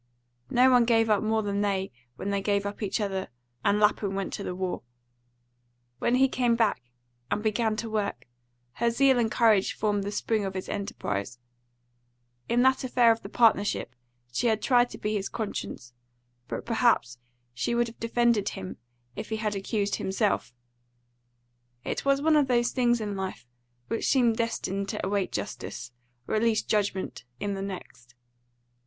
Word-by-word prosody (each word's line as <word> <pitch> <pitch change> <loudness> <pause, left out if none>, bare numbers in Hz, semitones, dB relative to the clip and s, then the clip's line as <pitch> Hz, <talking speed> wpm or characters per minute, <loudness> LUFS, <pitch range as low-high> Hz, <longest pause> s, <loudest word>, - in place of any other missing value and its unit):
No 255 +2 +5
one 245 -2 +5
gave 225 -2 +3
up 210 - +3
more 220 0 +1
than 200 0 -1
they 195 -4 0 0.2
when 200 +9 -4
they 200 0 0
gave 200 0 0
up 205 +2 -5
each 205 0 -1
other 195 -2 -2 0.4
and 205 +1 +3
Lapham 205 -2 +2
went 195 -1 -3
to 200 - -4
the 180 - -4
war. 185 -1 -3 1.2
When 235 - +2
he 265 +1 +5
came 245 -2 +1
back 225 - +1 0.5
and 210 - -1
began 220 0 +1
to 230 +1 -4
work, 205 - -2 0.5
her 235 - +1
zeal 265 +1 +4
and 225 -2 +2
courage 220 -5 +3
formed 205 -2 0
the 200 - -3
spring 215 +1 0
of 195 -1 -4
his 185 - -4
enterprise. 115 - -3 1.1
In 240 +1 +3
that 260 0 +3
affair 245 -2 +4
of 225 0 0
the 195 - -8
partnership 210 - +2 0.4
she 185 - 0
had 220 -2 +2
tried 245 -2 +4
to - - -9
be 210 - -2
his 200 -2 -2
conscience, 200 - -5 0.5
but - - -5
perhaps 230 - +2 0.3
she 235 - -1
would 240 0 +3
have 230 0 -11
defended 230 -2 +2
him 95 0 -7 0.4
if - - -6
he 220 - -1
had 215 -1 -1
accused 200 +1 -1
himself; 195 - 0 1.3
it - - -3
was 275 0 +2
one 315 0 +4
of 290 -3 +4
those 240 -1 +2
things 240 -2 +2
in 210 - -3
this 200 - -4
life 185 -12 -5 0.4
which 230 - -1
seem 245 -4 +4
destined 200 -4 -2
to - - -3
await 195 0 0
justice, 125 +1 -5 0.4
or - - -3
at 215 - +2
least 225 -1 +1
judgment, 200 -3 -1 0.2
in 205 - -2
the 195 - -4
next. 175 -11 -8
215 Hz, 175 wpm, -27 LUFS, 195-235 Hz, 1.3 s, No